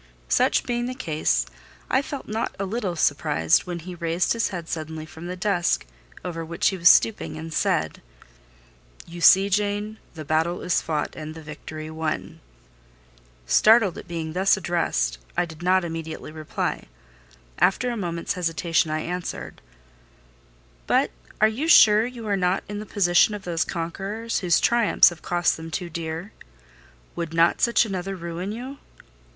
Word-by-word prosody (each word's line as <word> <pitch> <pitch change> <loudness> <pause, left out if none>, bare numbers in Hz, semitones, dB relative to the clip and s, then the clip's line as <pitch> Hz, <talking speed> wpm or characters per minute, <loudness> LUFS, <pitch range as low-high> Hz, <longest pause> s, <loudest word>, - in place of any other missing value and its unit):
Such - - +3
being 240 0 -1
the 255 - -4
case, 150 - 0 0.4
I 260 - +2
felt 280 -1 -7
not 220 +2 -3
a 195 - -2
little 195 -3 -3
surprised 80 - +2
when 175 -1 -3
he 175 +2 -8
raised 170 +1 0
his 230 -1 0
head 175 -4 -6
suddenly 160 -1 -5
from 160 +2 -10
the 180 - -4
desk 180 -2 0 0.4
over 165 -2 -4
which 165 +1 0
he 195 - -3
was 175 0 +7
stooping, 205 -8 +3
and 160 0 -7
said— 80 - 0 1.0
"You 170 0 -9
see, 190 +3 +7
Jane, 205 +2 -1 0.2
the 155 -1 -7
battle 160 +4 0
is 180 - +1
fought 155 -2 -3
and 155 0 -7
the 160 - -10
victory 155 +1 -8
won." 160 -1 -4 1.1
Startled 215 - +5
at - - -9
being 160 -2 -4
thus 190 +3 +3
addressed, 70 - -1 0.2
I - - +2
did 160 -1 -12
not 185 0 +3
immediately 160 -2 -6
reply: 155 -1 -4 0.7
after 245 +6 +2
a - - -3
moment's 170 -5 -3
hesitation 165 -2 0
I 155 0 -1
answered— 180 +1 -5 1.3
"But - - +2 0.3
are 215 - +6
you 245 +9 -2
sure 220 -7 +7
you 245 -3 -8
are 205 -1 +1
not 180 0 0
in 205 0 -5
the 210 - -8
position 190 +1 +3
of 205 - -8
those 170 -3 0
conquerors 195 +7 -3
whose 175 -4 +3
triumphs 235 -2 +5
have 175 -1 -11
cost 175 -1 +1
them 160 0 -8
too 175 +1 -4
dear? 165 +4 -5 0.8
Would 165 -1 -4
not 165 +1 +3
such 235 -1 +4
another 195 -1 -4
ruin 170 +2 -5
you?" 255 +5 -7
175 Hz, 160 wpm, -24 LUFS, 160-205 Hz, 1.3 s, was